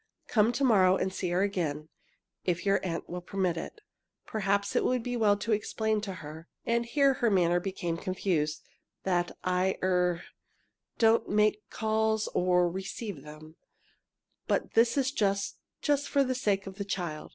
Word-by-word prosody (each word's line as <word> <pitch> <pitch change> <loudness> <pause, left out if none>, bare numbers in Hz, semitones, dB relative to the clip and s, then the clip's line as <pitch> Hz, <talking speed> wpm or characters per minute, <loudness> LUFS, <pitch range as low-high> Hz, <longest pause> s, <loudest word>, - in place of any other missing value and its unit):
"Come 220 0 +3
to 280 - -1
morrow 190 -7 +5
and 190 0 -1
see 180 - -2
her 180 +2 +2
again 155 -7 -2 0.6
if 170 0 -1
your 195 0 +3
aunt 170 -3 -3
will 180 +1 -5
permit 185 -1 -1
it. 300 - -7 0.4
Perhaps 200 -1 0
it - - +3
would 250 -2 +1
be 245 0 -3
well 210 -3 +3
to 225 +3 -3
explain 215 0 0
to 200 -2 -4
her 160 +2 -9
" - - -49
and 235 0 +1
here 275 +2 +3
her 240 -2 +1
manner 175 -3 +3
became 175 -3 -3
confused 170 -4 -1 0.4
"that 175 -2 0
I 185 +1 +1
er 180 -2 +1 0.7
do 225 -1 +6
not 230 - +1
make 210 0 +2
calls 220 0 0
or 180 0 +2
or 175 - +1
receive 190 - -5
them, 155 +2 -12 0.9
but - - 0
this 230 +3 +4
is 270 -1 +2
just 200 -6 0 0.2
just 290 -1 +1
for 280 -1 +3
the 260 -1 0
sake 205 -6 0
of 195 -1 -8
the - - -1
child." 175 -6 -4
195 Hz, 175 wpm, -29 LUFS, 180-220 Hz, 0.9 s, do